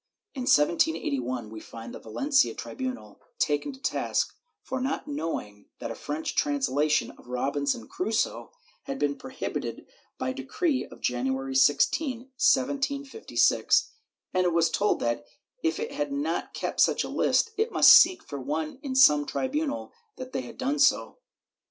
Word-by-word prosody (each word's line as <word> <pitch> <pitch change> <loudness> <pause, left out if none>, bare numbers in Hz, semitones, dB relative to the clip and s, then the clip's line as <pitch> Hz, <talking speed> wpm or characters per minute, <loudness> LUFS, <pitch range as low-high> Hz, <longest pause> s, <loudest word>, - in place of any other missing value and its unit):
In 255 -3 -5
1781 140 -7 +1
we 110 - -7
find 115 +1 -10
the - - -8
Valencia 275 - +1
tribunal 255 - -6 0.2
taken 145 - 0
to 265 - -13
task 265 +1 -1 0.3
for 260 -1 -4
not 270 +2 -2
knowing 160 - -5
that - - -5
a - - -3
French 150 +2 -4
translation 145 +1 +1
of - - -17
Robinson 135 -1 -1
Crusoe 220 +4 -2 0.3
had 275 -1 -4
been 145 - 0
prohibited - - -5 0.3
by 130 0 -2
decree 260 - -1
of - - -14
January 130 +2 -1
16, 145 - +3
1756, 275 - +1 0.4
and 185 0 +2
it 175 - +2
was 165 -1 +3
told 210 - +1
that, 120 0 -1 0.4
if 160 - 0
it - - -3
had 145 -1 -3
not 150 +4 -2
kept - - -3
such - - +3
a - - -5
list, 455 - +1
it 440 +3 0
must - - +8
seek 360 +2 +7
for 140 - -7
one 155 - -3
in 275 -3 -4
some 150 - +7
tribunal 285 +2 -2 0.2
that 255 0 -9
had 260 - -5
done 275 +3 -1
so. 275 - +3
165 Hz, 150 wpm, -27 LUFS, -, 0.4 s, must